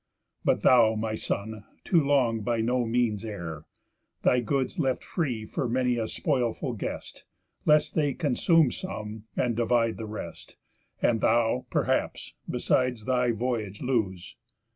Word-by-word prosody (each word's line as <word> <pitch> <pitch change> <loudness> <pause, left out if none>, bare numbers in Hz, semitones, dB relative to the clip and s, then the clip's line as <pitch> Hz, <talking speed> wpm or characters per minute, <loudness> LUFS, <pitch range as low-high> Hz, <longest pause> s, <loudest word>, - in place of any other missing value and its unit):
But - - +1
thou, 115 -3 +6
my 110 0 -2
son, 110 0 -3 0.2
too 170 -3 +3
long 130 -6 +2
by 115 +1 -1
no 120 +1 +1
means 115 -3 0
err, 85 -8 -6 0.6
Thy 125 - +4
goods 130 +2 -1
left 130 -1 0
free 125 - -2
for 125 +3 -3
many 125 0 +1
a 115 -1 -1
spoilful 125 -2 -1
guest, 110 - -6 0.4
Lest 150 0 +4
they 145 -4 +1
consume 155 0 +3
some, 110 - -6
and 120 -2 +1
divide 115 -1 +1
the 110 - -6
rest, 105 0 -8 0.5
And 115 -2 +3
thou, 120 +2 +2
perhaps, - - -1 0.2
besides, 125 -4 0
thy 125 -1 +2
voyage 110 -3 -2
lose. 100 -9 -2
120 Hz, 140 wpm, -27 LUFS, 110-130 Hz, 0.6 s, thou